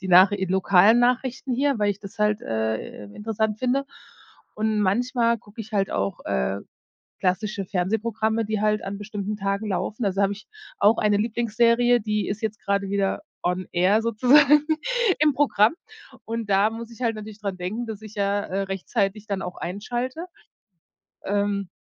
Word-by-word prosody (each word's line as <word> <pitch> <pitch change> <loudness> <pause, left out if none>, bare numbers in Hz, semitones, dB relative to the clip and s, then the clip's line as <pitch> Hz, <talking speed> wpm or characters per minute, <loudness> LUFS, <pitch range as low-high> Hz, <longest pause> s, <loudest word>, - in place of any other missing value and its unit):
die 190 - -6
Nach 185 +2 +8
lokalen 190 +2 +4
Nachrichten 250 +1 0
hier, 275 0 +1
weil 205 -1 +2
ich 200 0 -5
das 200 0 -11
halt, 210 0 +2
äh, 110 -1 -3
interessant 220 0 -2
finde. 255 +3 0 0.7
Und 215 0 0
manchmal 235 +3 +1
gucke 210 +2 -12
ich 220 0 -9
halt 195 -2 +1
auch, 100 0 -2
äh, 65 +9 -1 0.6
klassische 195 +2 -1
Fernsehprogramme, 220 +4 -1
die 215 0 -2
halt 215 0 +1
an 195 +1 -5
bestimmten 205 0 -5
Tagen 200 +2 -2
laufen. 210 +4 -2
Also 195 0 0
habe 200 0 +2
ich 205 - -13 0.3
auch 210 +3 +5
eine 210 -1 +2
Lieblingsserie, 235 +2 +2
die 210 0 -1
ist 200 +3 -3
jetzt 220 -1 -3
gerade 200 0 -1
wieder 200 -1 0 0.2
on 180 +1 -1
air 185 +5 +3
sozusagen 270 +6 +5 0.5
im 300 -1 +4
Programm. 250 -5 +3 0.5
Und 225 -1 -4
da 200 +2 +4
muss 230 +1 -8
ich 230 - -13
halt 230 -2 +1
natürlich 215 0 -9
dran 200 -3 -4
denken, 200 +7 -4
dass 220 -2 -6
ich 215 -1 -11
ja, 200 0 0
äh, 195 +1 -2
rechtzeitig 195 +2 -2
dann 200 -2 -2
auch 180 - -5
einschalte. 240 - -4 1.0
Ähm, 200 -1 -1
210 Hz, 165 wpm, -24 LUFS, 195-230 Hz, 1.0 s, Nach